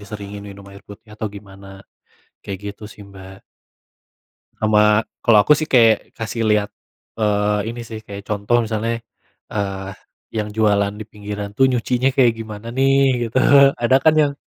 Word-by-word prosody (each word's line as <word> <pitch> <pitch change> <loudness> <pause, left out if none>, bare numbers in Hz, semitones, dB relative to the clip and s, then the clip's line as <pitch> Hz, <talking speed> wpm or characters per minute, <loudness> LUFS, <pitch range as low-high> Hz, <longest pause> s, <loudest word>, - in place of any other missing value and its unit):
diseringin 100 0 -8
minum 100 0 -13
air 100 - -14
putih 110 +2 -14
atau 110 - -4
gimana, 100 -1 -13 0.8
kayak 100 - -5
gitu, 105 - -16
sih, - - -14
Mbak. 95 0 -13 1.2
Sama 105 0 +4 0.2
kalau 115 -2 +6
aku, 150 - +4
sih, 155 - -3
kayak 115 -4 +4
kasih 115 +1 -3
lihat, 105 -1 +2 0.5
eee, 105 0 0
ini, 120 - -7
sih, 110 -1 -7
kayak 100 0 -8
contoh 105 +3 0
misalnya, 115 +1 -2 0.5
eee, 95 -2 -3 0.5
yang 105 -1 -2
jualan 100 -2 +2
di - - -5
pinggiran, 105 -1 -6
tuh, 135 - +4
nyucinya 125 +1 0
kayak 125 -3 +5
gimana, 110 0 -8
nih, 135 -2 +2
gitu. 110 - -10 0.4
Ada, 120 +2 +4
kan, 160 -1 +5
yang 145 -1 +2
105 Hz, 155 wpm, -20 LUFS, 100-115 Hz, 1.2 s, kalau